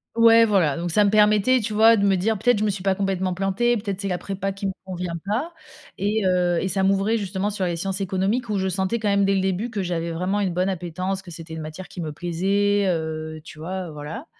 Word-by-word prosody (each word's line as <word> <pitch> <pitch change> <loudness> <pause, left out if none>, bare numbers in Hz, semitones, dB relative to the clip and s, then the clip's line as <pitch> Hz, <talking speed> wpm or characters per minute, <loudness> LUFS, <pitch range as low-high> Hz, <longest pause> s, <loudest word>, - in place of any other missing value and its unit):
Ouais 230 0 +7
voilà, 185 -9 +2
donc 170 0 -3
ça 210 +5 +4
me 200 - +3
permettait, 210 +4 +4
tu 215 -1 -3
vois, 225 +2 +6
de 200 - +2
me 195 - +4
dire: 210 +4 0
«Peut-être, 245 0 +3
je - - 0
me 215 - +2
suis 195 -2 -4
pas 195 -1 +2
complètement 190 -1 -1
plantée, 195 +6 +1
peut-être 200 -3 -4
c'est 200 - -3
la 180 -2 -1
prépa 195 +2 -4
qui 195 +1 -6
me 195 - 0
convient 180 -2 -4
pas» 245 - -2 0.4
et 205 +2 0
heu, 180 -1 +2
et 190 - -1
ça, 190 +1 0
m'ouvrait 195 +3 +2
justement 200 -1 -2
sur 200 -2 -2
les 175 -1 -1
sciences 190 +3 -3
économiques 195 +6 -1
où 210 - 0
je 190 0 0
sentais 190 +4 -1
quand 215 -2 -1
même 200 0 +3
dès 195 0 +2
le 190 - +1
début 190 +5 -1
que 210 -4 -3
j'avais 170 -2 -2
vraiment 185 +5 -1
une 190 -3 0
bonne 180 +2 0
appétence, 185 +1 -3
que 180 -3 -12
c'était 165 0 -9
une 160 - -5
matière 155 +4 -8
qui - - -10
me 155 -3 -4
plaisait, 195 +5 +1
heu, 160 -2 -3
tu 155 - -12
vois? 180 +1 -5
Voilà. 150 - -7
195 Hz, 255 wpm, -23 LUFS, 180-205 Hz, 0.4 s, Ouais